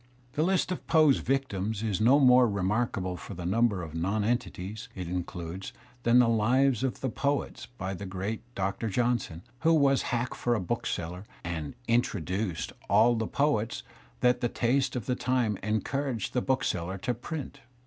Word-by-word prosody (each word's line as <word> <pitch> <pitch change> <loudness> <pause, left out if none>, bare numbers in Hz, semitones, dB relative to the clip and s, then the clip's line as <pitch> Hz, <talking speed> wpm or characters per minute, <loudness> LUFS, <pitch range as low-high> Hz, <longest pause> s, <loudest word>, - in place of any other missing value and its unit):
The 150 - 0
list 185 +2 +2
of 180 - -5
Poe's 155 -4 +5
victims 110 -6 -1
is 105 -2 -1
not 135 +6 +5
more 125 -1 +7
re 100 -3 -2
markable 95 -3 0
for 85 +6 -8
the 90 0 -6
number 100 -1 +2
of 80 -2 -8
nonentities 105 +3 -2
it 90 -2 -5
includes 90 +1 -5 0.3
than 120 0 +4
"The 125 -1 +6
Lives 120 +3 +3
of 130 -2 -2
the 130 - 0
Poets'* 140 +3 -2
by 95 -6 -5
the 95 +1 -6
great 100 +4 -3
Doctor 100 +4 -1
Johnson, 115 -6 0 0.2
who 165 0 +4
was 140 -3 +4
hack 120 +1 -1
for 120 -1 0
a - - 0
bookseller, 90 0 -3 0.2
and 80 -3 -4
"introduced" 100 -5 -1 0.2
all 110 +4 +5
the 110 -2 -1
poets 120 -6 0 0.4
that 125 0 +3
the 120 - +1
taste 130 +3 +1
of 120 -5 -3
the 125 - 0
time 125 -5 0
encouraged 110 +2 -2
the 125 - +1
bookseller 95 -9 -1
to 125 +6 -1
print. 140 +4 -6
115 Hz, 170 wpm, -29 LUFS, 95-125 Hz, 0.4 s, more